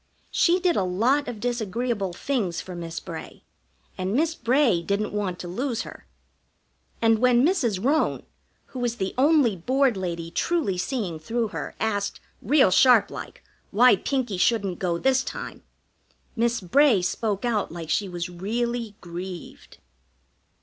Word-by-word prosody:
She 355 Hz, +1 st, +3 dB
did 360 Hz, -2 st, +2 dB
a -, -, +2 dB
lot 235 Hz, +11 st, +1 dB
of 240 Hz, -3 st, -5 dB
disagreeable 235 Hz, -3 st, -2 dB
things 195 Hz, -3 st, -2 dB
for 185 Hz, -, -7 dB
Miss 170 Hz, -1 st, -5 dB
Bray, -, -, -9 dB, 0.6 s
and 185 Hz, +3 st, -1 dB
Miss 320 Hz, +4 st, +2 dB
Bray 250 Hz, -, +2 dB
didn't 200 Hz, +5 st, -2 dB
want 200 Hz, -4 st, -2 dB
to 180 Hz, -, -7 dB
lose 240 Hz, +6 st, -2 dB
her. -, -, -12 dB, 1.0 s
And 225 Hz, -1 st, +4 dB
when 250 Hz, +1 st, +4 dB
Mrs. 240 Hz, -, +1 dB
Roane, 305 Hz, +3 st, +1 dB, 0.5 s
who 255 Hz, -2 st, -4 dB
is 240 Hz, -1 st, 0 dB
the 190 Hz, -4 st, -3 dB
only 275 Hz, -5 st, +4 dB
Board 260 Hz, +7 st, +1 dB
lady 170 Hz, -3 st, -4 dB
truly 320 Hz, -, 0 dB
seeing 190 Hz, -, -2 dB
through 225 Hz, +7 st, -2 dB
her, -, -, -6 dB
asked, 205 Hz, -2 st, -1 dB, 0.2 s
real 265 Hz, -3 st, +4 dB
sharplike, 245 Hz, +2 st, +3 dB, 0.3 s
why 245 Hz, +2 st, +6 dB
Pinkie 240 Hz, -3 st, -2 dB
shouldn't 200 Hz, -5 st, +1 dB
go 175 Hz, -2 st, 0 dB
this 260 Hz, +6 st, +2 dB
time, -, -, -7 dB, 0.7 s
Miss 235 Hz, -1 st, +1 dB
Bray 215 Hz, -, +4 dB
spoke 210 Hz, +3 st, -1 dB
out 220 Hz, -7 st, 0 dB
like 165 Hz, -2 st, -6 dB
she 200 Hz, +4 st, 0 dB
was 175 Hz, -1 st, -4 dB
really 225 Hz, +5 st, -3 dB
grieved. 175 Hz, +1 st, -8 dB
220 Hz, 145 wpm, -25 LUFS, 185-255 Hz, 1.0 s, why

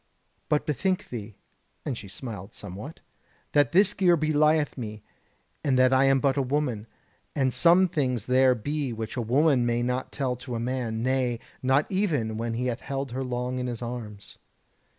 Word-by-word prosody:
But 150 Hz, -, +1 dB
bethink 185 Hz, +5 st, -1 dB
thee" 110 Hz, -3 st, -7 dB, 0.5 s
(and 135 Hz, -, -2 dB
she 105 Hz, -, -9 dB
smiled 100 Hz, -2 st, -8 dB
somewhat) 105 Hz, -, -8 dB, 0.5 s
"that 145 Hz, -1 st, +3 dB
this 195 Hz, +3 st, +5 dB
gear 180 Hz, -4 st, +4 dB
belieth 155 Hz, 0 st, +2 dB
me, 110 Hz, -4 st, -7 dB, 0.6 s
and 135 Hz, -3 st, +2 dB
that 130 Hz, 0 st, +5 dB
I 130 Hz, +1 st, +5 dB
am 135 Hz, 0 st, +4 dB
but 135 Hz, 0 st, +1 dB
a -, -, +3 dB
woman; 130 Hz, -5 st, -1 dB, 0.5 s
and 130 Hz, -3 st, +1 dB
some 175 Hz, +2 st, +5 dB
things 125 Hz, -, -1 dB
there 130 Hz, 0 st, +4 dB
be 140 Hz, +4 st, -3 dB
which 110 Hz, -1 st, -5 dB
a 125 Hz, -, -1 dB
woman 130 Hz, +3 st, +3 dB
may 120 Hz, 0 st, +1 dB
not 125 Hz, +1 st, -2 dB
tell 130 Hz, -3 st, -1 dB
to 125 Hz, -1 st, -6 dB
a -, -, -2 dB
man, 120 Hz, -2 st, -2 dB
nay, 130 Hz, -2 st, 0 dB, 0.2 s
not 135 Hz, +2 st, +3 dB
even 150 Hz, -, 0 dB
when 115 Hz, 0 st, -2 dB
he 125 Hz, +2 st, -2 dB
hath 125 Hz, -1 st, -2 dB
held 135 Hz, -1 st, -4 dB
her 130 Hz, +2 st, -3 dB
long 125 Hz, 0 st, -3 dB
in 125 Hz, -, -2 dB
his 120 Hz, -1 st, -4 dB
arms." 110 Hz, -4 st, -7 dB
130 Hz, 180 wpm, -26 LUFS, 115-145 Hz, 0.6 s, this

